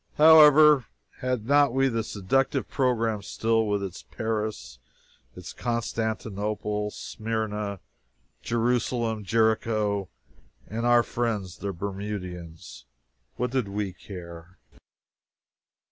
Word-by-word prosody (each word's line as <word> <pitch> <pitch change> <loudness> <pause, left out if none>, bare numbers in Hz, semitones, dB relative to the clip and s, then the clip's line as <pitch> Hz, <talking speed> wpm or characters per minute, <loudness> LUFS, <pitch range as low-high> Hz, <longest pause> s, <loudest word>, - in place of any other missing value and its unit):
However, 150 -3 +8 0.3
had 125 -4 -2
not 140 -1 +4
we 135 0 +3
the 115 -3 -1
seductive 110 +8 0
program 115 -5 0
still, 115 +2 0
with 100 -1 0
its 95 -3 -6
Paris, 105 - -4 0.6
its 90 -1 -9
Constantinople, 110 -3 -2
Smyrna, 105 -2 -4 0.6
Jerusalem, 120 -1 0
Jericho, 110 -2 +1 0.6
and 115 +3 -3
"our 120 -1 +5
friends 105 -8 -3
the 100 - -3
Bermudians?" 90 -8 -7 0.5
What 125 0 -2
did 130 -5 0
we 100 -1 -3
care? 85 -2 -11
110 Hz, 95 wpm, -26 LUFS, 100-120 Hz, 0.6 s, However